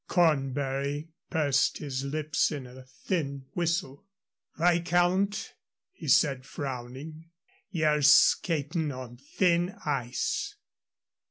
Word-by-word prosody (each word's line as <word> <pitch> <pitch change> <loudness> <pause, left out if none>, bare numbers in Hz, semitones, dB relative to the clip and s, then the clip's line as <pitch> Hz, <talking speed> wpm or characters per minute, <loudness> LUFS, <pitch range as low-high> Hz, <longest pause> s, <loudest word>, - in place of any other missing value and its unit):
Cornbury 140 -2 0 0.2
pursed 145 -4 +2
his 135 -3 -4
lips 150 +3 0
in 145 -4 -5
a 125 +1 -12
thin 140 +1 -4
whistle. 170 -1 -2 0.5
"Viscount," 175 +3 +2 0.4
he 370 - -10
said, 135 -4 +3
frowning, 140 +4 -7 0.4
"ye're 155 -5 +1
skatin' 155 +2 +4
on 125 -2 -8
thin 175 +6 +1
ice." 125 -5 -2
150 Hz, 90 wpm, -28 LUFS, 135-170 Hz, 0.5 s, skatin